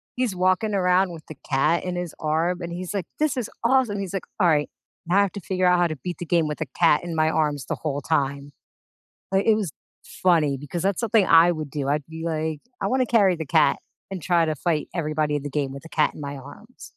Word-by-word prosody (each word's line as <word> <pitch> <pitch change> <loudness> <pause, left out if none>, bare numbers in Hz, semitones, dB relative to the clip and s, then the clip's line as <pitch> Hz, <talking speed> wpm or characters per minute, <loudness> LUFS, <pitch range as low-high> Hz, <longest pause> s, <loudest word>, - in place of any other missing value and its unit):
he's 245 -6 -1
walking 185 +4 +1
around 180 -1 +2
with 160 -2 -11
the 155 - -9
cat 150 +5 +2
in 180 -1 -3
his 175 -2 -4
arm, 165 +4 0
and 170 0 -5
he's, 180 +2 -5
like, 190 -4 -2
"This 305 -4 +1
is 235 - -2
awesome." 235 -5 +2
He's, 195 -1 -5
like, 195 - -2 0.2
"All 175 - +4
right, 150 -2 +2 0.4
now 185 +4 +3
I - - +6
have 200 - +1
to 200 - -6
figure 185 +1 -1
out 180 0 +5
how 175 - +3
to 155 -3 -5
beat 180 -1 -4
the 175 - -4
game 165 -2 +2
with 150 - -5
a - - 0
cat 165 -2 +4
in 170 -2 -5
my 155 0 +3
arms 150 -5 0
the - - -1
whole 145 -2 -3
time." 140 +2 -1 0.8
Like, 195 +1 +2
it 220 -1 +5
was 200 -8 -2 0.5
funny 160 -6 +3
because 145 +5 -5
that's 195 -1 0
something 220 -3 +3
I 165 +1 +7
would 155 -3 -4
do. 140 -2 -2
I'd 145 -1 0
be, 160 0 -8
like, 160 -2 -2 0.2
"I - - 0
wanna 255 0 +2
carry 205 -6 +3
the 160 -2 -5
cat 160 +2 +3 0.3
and 185 -3 -5
try 170 -1 +2
to 155 -1 -1
fight 155 0 -1
everybody 155 -2 0
in 145 - -3
the 145 - -4
game 140 -1 -2
with 140 - -9
the 165 - -12
cat 155 - +1
in - - -9
my 140 0 -5
arms." 220 - -13
170 Hz, 250 wpm, -24 LUFS, 150-185 Hz, 0.8 s, I